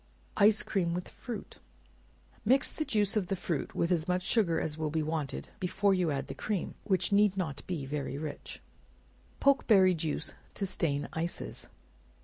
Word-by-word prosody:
Ice 210 +1 +6
Cream 175 -4 0
with 180 - -4
Fruit. 235 -5 -8 0.8
Mix 265 +5 +3
the 310 - -3
juice 210 -7 +2
of 200 -4 +1
the 195 - 0
fruit 170 -5 -3
with 170 - +1
as 170 -1 +1
much 180 0 +1
sugar 185 -6 +2
as 150 - -2
will 155 -1 -2
be 155 +1 0
wanted 155 -2 -3
before 195 +1 +2
you 180 -3 +2
add 140 -2 -1
the - - -6
cream, 205 -5 -2
which 185 -3 +1
need 200 -1 +4
not 150 -7 -2
be 165 -7 -3
very 140 -1 -3
rich. 150 0 -6 0.8
Pokeberry 210 -9 +5
Juice 160 -1 -2 0.2
to 200 - -1
Stain 145 -6 0
Ices. 165 +2 -2
180 Hz, 165 wpm, -31 LUFS, 155-200 Hz, 0.8 s, Ice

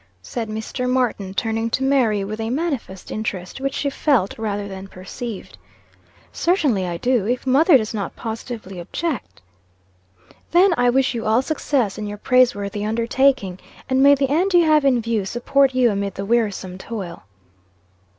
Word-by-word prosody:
said 230 -3 -4
Mr. 220 +4 -3
Martin, 245 -7 0
turning 225 +2 -1
to 260 - -1
Mary, 245 -7 +2
with 215 +3 -5
a 225 - -2
manifest 265 - -3
interest, 205 +1 -4
which 275 0 -2
she 285 - -1
felt, 275 -7 +1
rather 205 -2 -2
than 190 0 -8
perceived. 195 - -8 0.7
"Certainly 285 - +1
I 170 -1 -3
do, 240 0 +1
if 245 +2 -1
mother 280 +4 +5
does 215 -2 -4
not 205 -3 -4
positively 220 -4 -6
object." 275 - -4 1.1
"Then 355 +2 +5
I 245 -3 +3
wish 265 +1 +2
you 230 -2 -3
all 225 +4 +3
success 265 -9 -1
in 210 - -4
your 205 0 -6
praiseworthy 210 -4 +2
undertaking. 230 -3 +1 0.3
And 260 0 +2
may 280 +1 +7
the 275 -1 0
end 360 +5 +2
you 345 -1 +6
have 305 -2 +4
in 250 -4 +3
view 230 -3 0
support 260 +6 +1
you 250 -3 +4
amid 200 -1 -3
the 195 - -4
wearisome 200 -5 -1
toil." 190 -6 -6
230 Hz, 160 wpm, -21 LUFS, 205-270 Hz, 1.1 s, may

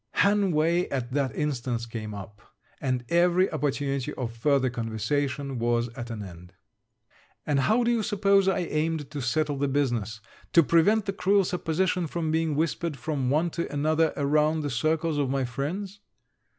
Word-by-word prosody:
Hanway 180 -4 +2
at 130 -2 -3
that 135 -4 -1
instant 125 -5 -2
came 110 -2 -5
up, 100 +1 -10 0.4
and 125 -2 -1
every 175 +2 +3
opportunity 140 -3 -1
of 120 -3 -4
further 135 +2 +2
conversation 130 +4 -2
was 120 0 +1
at 120 0 -8
an 110 -3 -5
end. 90 -1 -11 0.9
And 145 -2 +1
how 220 - +3
do 235 - +2
you 235 -2 +1
suppose 200 -1 +2
I 190 - +2
aimed 155 -3 -2
to 145 -2 -4
settle 145 +4 0
the 140 - +1
business, 120 -6 -1 0.3
to 170 - +7
prevent 200 +8 +3
the 195 - -2
cruel 195 +1 +3
supposition 180 0 0
from 160 0 -2
being 160 -1 0
whispered 160 0 -1
from 135 -1 -2
one 160 +5 +1
to 170 - -3
another 155 +2 +2
around 150 +2 +2
the 145 -2 -3
circles 155 +5 0
of 140 -2 0
my 135 -1 0
friends? 175 +11 -4
145 Hz, 165 wpm, -27 LUFS, 125-170 Hz, 0.9 s, to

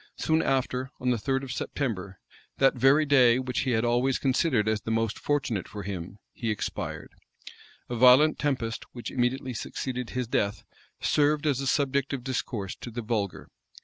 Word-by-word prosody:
Soon 160 0 +2
after, 130 -2 0
on 125 0 +1
the 120 - +1
third 135 +4 -1
of 135 - -6
September, 100 -9 -3 0.4
that 135 0 +4
very 135 +5 +4
day 125 -4 +5
which 125 -2 -2
he 130 - 0
had 110 +1 +1
always 120 +2 +2
considered 130 -4 +1
as 110 -1 +1
the - - -6
most 115 -1 0
fortunate 130 -10 -1
for 105 -1 -7
him, 95 0 -6 0.2
he 115 - -3
expired, 105 - -4 0.8
A 120 - -4
violent 130 +6 +6
tempest, 125 -6 -1
which 120 - -6
immediately 130 +1 -1
succeeded 125 +2 -4
his 125 -2 -3
death, 100 -3 -1 0.4
served 150 +1 +2
as 140 -3 +1
a 135 - -2
subject 140 0 +1
of 130 -3 -4
discourse 120 -6 -3
to - - -8
the 120 +1 -5
vulgar. 105 -4 -3
125 Hz, 175 wpm, -27 LUFS, 115-135 Hz, 0.8 s, violent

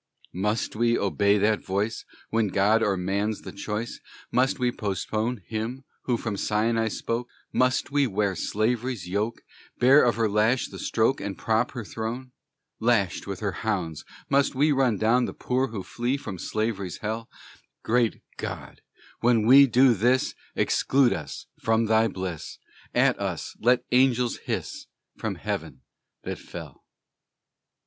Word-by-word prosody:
Must 105 +6 -1
we 115 +1 +2
obey 100 +1 +2
that 105 +1 +2
voice? 100 +4 -2 0.3
When 115 -1 +2
God 105 +3 +3
or 100 -3 +1
man's 100 +4 -1
the - - -7
choice, 105 +3 -4 0.3
Must 130 +2 +2
we 125 -1 +1
postpone 110 +2 -2
Him, 115 +4 -4 0.2
who 120 -2 +1
from 110 -3 -3
Sinai 110 +2 +1
spoke? 115 +2 -3 0.2
Must 130 +2 +1
we 145 -1 +3
wear 100 -2 0
slavery's 110 +2 -1
yoke? 105 +5 -2 0.3
Bear 135 +4 +6
of 120 - +3
her 115 -1 +2
lash 110 +5 +2
the - - -9
stroke, 115 +4 +1
And 100 -2 -4
prop 110 +2 0
her 120 -4 -5
throne? 115 +5 -5 0.5
Lashed 110 -7 +1
with 100 -2 -5
her 100 -2 0
hounds, 90 -8 -2 0.2
must 140 0 +2
we 150 +3 +3
Run 130 -6 +2
down 120 +4 +3
the - - -6
poor 130 +1 0
who 110 -5 -6
flee 120 +7 -2
From 95 -9 -7
Slavery's 110 -4 -2
hell? 110 +2 -4 0.5
Great 120 0 +1
God! - - -6 0.4
when 115 -2 +3
we 135 +4 +8
do 125 +1 +5
this 120 +5 +2 0.2
Exclude 135 -2 +3
us - - -6
from 115 0 +2
thy 110 +1 +4
bliss; 95 -5 -5 0.4
At - - +3
us - - -4
let 125 +1 +3
angels 125 -1 +3
hiss - - -5 0.3
From - - -2
heaven - - -5 0.4
that - - -5
fell! - - -10
115 Hz, 150 wpm, -26 LUFS, 105-125 Hz, 0.5 s, we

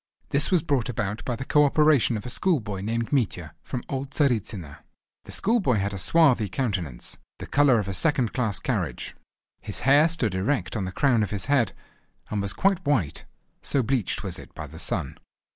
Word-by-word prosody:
This 145 +2 +2
was 180 -5 +3
brought 135 -7 0
about 105 -2 -3
by 125 - -1
the 130 +3 -6
co 150 +2 +4
operation 145 -5 +4
of 105 - -8
a - - -4
schoolboy 115 - -1
named 115 +5 -2
Mitya 90 - 0
from 125 -2 -5
old 135 -1 -4
Tzaritzyno. 110 - -1 0.5
The - - -10
schoolboy 200 - +1
had 100 0 -1
a 95 - -5
swarthy 125 - +3
countenance, 90 - -3 0.2
the - - -7
colour 140 -4 +4
of 105 -3 -1
a 100 - -3
second 130 - +1
class 110 -6 0
carriage. - - -3 0.5
His - - -5
hair 145 +4 +5
stood 130 - 0
erect 110 +10 -1
on 100 -4 -1
the 95 - -4
crown 120 +2 +2
of 105 - 0
his 100 -2 -2
head, 130 -7 +2 0.6
and 105 -1 0
was 100 -1 -2
quite 190 -1 +1
white, 130 - 0 0.4
so 135 - +1
bleached 120 -4 -1
was - - -4
it - - -12
by - - -6
the - - -11
sun. - - -2
125 Hz, 195 wpm, -25 LUFS, 100-145 Hz, 0.6 s, hair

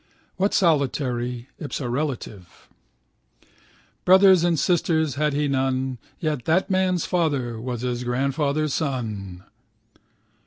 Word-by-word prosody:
Why 195 +2 +2
solitary 130 -8 0
(ipsorelative)? 125 - -4 1.4
Brothers 190 -1 +6
and 175 -2 +2
sisters 160 -2 +1
had 150 +2 0
he 145 +1 0
none. 130 -2 -1 0.2
Yet 150 -6 -2
that 180 +5 +1
man's 185 -2 +1
father 140 -10 -1
was 120 -1 -4
his 125 -1 -2
grandfather's 140 +4 0
son. 105 - -3
140 Hz, 100 wpm, -23 LUFS, 125-160 Hz, 1.4 s, Brothers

